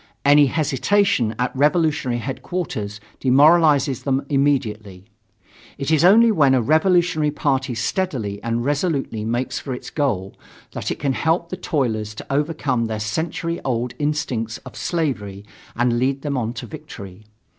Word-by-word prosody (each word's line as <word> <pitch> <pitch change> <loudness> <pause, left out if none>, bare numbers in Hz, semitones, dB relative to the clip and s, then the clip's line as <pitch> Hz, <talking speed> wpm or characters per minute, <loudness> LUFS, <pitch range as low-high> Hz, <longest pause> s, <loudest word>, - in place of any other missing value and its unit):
Any 145 0 +6
hesitation 145 - +1
at 125 +1 -2
revolutionary 150 -3 +1
headquarters 130 - -4 0.2
demoralizes 145 0 +4
them 135 0 -1
immediately. 110 -10 -1 0.7
It 140 +2 -2
is 155 -1 +3
only 225 +6 +6
when 140 -9 +4
a 130 - +2
revolutionary 160 - +2
party 135 -3 -1
steadily 110 - -2
and 115 +1 -2
resolutely 140 - -1
makes 120 +3 -2
for 130 -3 -5
its - - -9
goal, 105 - -1 0.4
that - - -4
it - - -3
can 140 -2 -1
help 165 +4 0
the 185 - -4
toilers 115 - -2
to - - -8
overcome 145 -5 0
their 110 -1 -3
century 160 +9 -3
old 125 -1 -2
instincts 135 -7 -2
of - - -10
slavery 105 - -3 0.3
and 120 0 +1
lead 135 +2 0
them 145 -2 -2
on 120 -2 -2
to 120 - -7
victory. 110 - -10
135 Hz, 145 wpm, -21 LUFS, 115-155 Hz, 0.7 s, Any